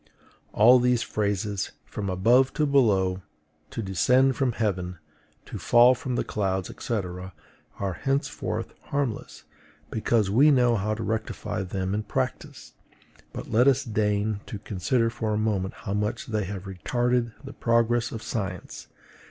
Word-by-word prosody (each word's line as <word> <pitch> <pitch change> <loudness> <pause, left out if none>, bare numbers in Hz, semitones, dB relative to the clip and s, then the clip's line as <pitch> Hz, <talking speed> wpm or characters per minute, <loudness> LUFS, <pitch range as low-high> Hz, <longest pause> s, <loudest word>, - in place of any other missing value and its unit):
All 120 +4 +6
these 125 -1 +2
phrases 100 -1 -2
FROM 100 -2 -5
ABOVE 120 +8 +3
TO 150 - +1
BELOW; 100 -10 +2 0.5
TO 115 - -5
DESCEND 125 +8 +3
FROM 130 -2 0
HEAVEN; 90 -5 -2 0.5
TO - - -7
FALL 120 +2 +6
FROM 125 0 -4
THE - - 0
CLOUDS, 95 -3 -2
&C. 120 - -2 0.8
are 95 -2 -2
henceforth 135 +1 -2
harmless, 140 -6 -3 0.5
because 110 -2 +1
we 135 +8 +6
know 125 -4 +4
how 105 +1 -1
to 110 - -5
rectify 110 -3 -3
them 95 0 -3
in 105 - 0
practice; - - -4 0.6
but - - -7
let 120 +4 +4
us 135 -1 +4
deign 105 -2 0
to 105 - -5
consider 110 +4 0
for 110 -2 -2
a - - 0
moment 105 -3 -1
how 100 - -2
much 105 +1 -2
they 110 -3 -2
have 95 0 -6
retarded 120 +6 -1
the 135 0 -9
progress 115 0 +1
of 115 - -6
science. 95 -6 -5
110 Hz, 145 wpm, -26 LUFS, 100-120 Hz, 0.8 s, All